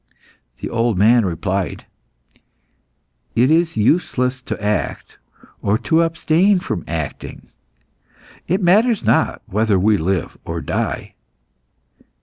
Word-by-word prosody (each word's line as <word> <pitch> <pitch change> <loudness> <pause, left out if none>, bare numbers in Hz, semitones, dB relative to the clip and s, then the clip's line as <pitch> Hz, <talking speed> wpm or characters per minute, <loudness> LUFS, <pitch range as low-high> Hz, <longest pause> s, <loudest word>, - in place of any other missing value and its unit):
The - - -5
old 115 -3 0
man 115 +3 +4
replied 95 +2 -3 1.5
"It 125 +5 +3
is 165 -3 +2
useless 125 0 +1
to - - -5
act, 105 0 -3 0.4
or 100 +2 +1
to 160 +7 +1
abstain 165 +4 +2
from 90 - -4
acting. 80 -3 -6 1.0
It 185 +3 0
matters 215 +5 +3
not - - +1
whether 105 0 +1
we 105 +3 +3
live 90 +2 -2
or - - -4
die." - - -3
115 Hz, 110 wpm, -19 LUFS, 100-165 Hz, 1.5 s, man